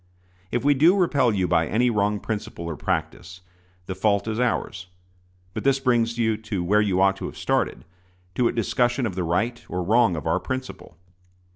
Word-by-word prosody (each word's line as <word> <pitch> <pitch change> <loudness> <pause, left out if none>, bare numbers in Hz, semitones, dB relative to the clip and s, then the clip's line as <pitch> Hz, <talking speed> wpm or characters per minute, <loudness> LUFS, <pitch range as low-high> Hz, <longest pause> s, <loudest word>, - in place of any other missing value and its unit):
If 120 - -2
we 145 - +5
do 165 +8 +4
repel 140 -9 +2
you 95 -3 0
by 85 -2 +2
any 120 +3 +2
wrong 105 -1 0
principle 105 -6 -5
or 85 -2 -4
practice, 90 +2 -4 0.4
the 95 - -4
fault 100 +2 +1
is 110 +1 -2
ours; 95 -7 -1 0.7
but - - -5
this 135 -1 +3
brings 120 -3 +1
you 110 -2 +1
to 105 -4 -4
where 105 +4 +3
you 95 -3 +1
ought 95 0 +3
to - - -5
have - - -10
started - - -1 0.5
to 125 - +2
a - - +1
discussion 120 +3 0
of 105 - -2
the 90 0 -2
right 115 +9 -1
or 90 0 -2
wrong 110 0 +3
of 75 - -6
our 80 +3 +1
principle. 130 -9 -6
105 Hz, 190 wpm, -24 LUFS, 90-120 Hz, 0.7 s, we